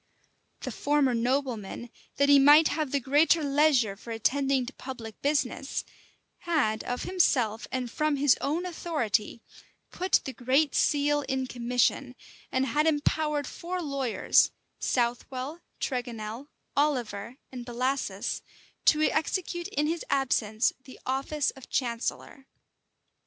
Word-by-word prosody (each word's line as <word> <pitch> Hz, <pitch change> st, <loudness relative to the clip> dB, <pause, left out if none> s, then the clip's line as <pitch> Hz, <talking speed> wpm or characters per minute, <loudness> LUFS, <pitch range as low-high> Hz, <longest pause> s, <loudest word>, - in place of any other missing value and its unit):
The -, -, -4 dB
former 285 Hz, -3 st, +1 dB
nobleman, 240 Hz, -2 st, -2 dB, 0.2 s
that 280 Hz, -, +3 dB
he 285 Hz, 0 st, +7 dB
might 295 Hz, +3 st, +7 dB
have 305 Hz, -2 st, -1 dB
the 280 Hz, -, +1 dB
greater 295 Hz, +5 st, +3 dB
leisure 280 Hz, -7 st, +3 dB
for 220 Hz, -, -13 dB
attending 265 Hz, +3 st, +1 dB
to 265 Hz, -, -8 dB
public 235 Hz, -5 st, -8 dB
business, 280 Hz, -1 st, -1 dB, 0.6 s
had, 275 Hz, -11 st, 0 dB
of 245 Hz, -, -3 dB
himself 245 Hz, -, +1 dB
and 255 Hz, -1 st, -2 dB
from 305 Hz, +4 st, 0 dB
his 280 Hz, -1 st, +4 dB
own 320 Hz, +6 st, -1 dB
authority, 265 Hz, -, -2 dB, 0.5 s
put 370 Hz, +1 st, +2 dB
the 265 Hz, -, -5 dB
great 265 Hz, +5 st, +2 dB
seal 290 Hz, 0 st, +2 dB
in 265 Hz, -1 st, 0 dB
commission, 250 Hz, +1 st, 0 dB, 0.4 s
and 260 Hz, +1 st, +1 dB
had 295 Hz, +5 st, +1 dB
empowered 300 Hz, -1 st, +1 dB
four 360 Hz, +6 st, -5 dB
lawyers 275 Hz, -7 st, +2 dB, 0.3 s
Southwell, 255 Hz, +5 st, -2 dB, 0.2 s
Tregonel, 240 Hz, -1 st, -4 dB, 0.3 s
Oliver, 245 Hz, -6 st, -1 dB
and 250 Hz, -2 st, -7 dB
Bellasis, 255 Hz, +3 st, -2 dB, 0.4 s
to 310 Hz, 0 st, +5 dB
execute 345 Hz, +2 st, -1 dB
in 295 Hz, +2 st, -1 dB
his 330 Hz, +2 st, -1 dB
absence 235 Hz, -5 st, +1 dB
the 260 Hz, -, -13 dB
office 270 Hz, +3 st, 0 dB
of 265 Hz, -, -14 dB
chancellor. 250 Hz, +2 st, -3 dB
270 Hz, 125 wpm, -28 LUFS, 245-295 Hz, 0.6 s, he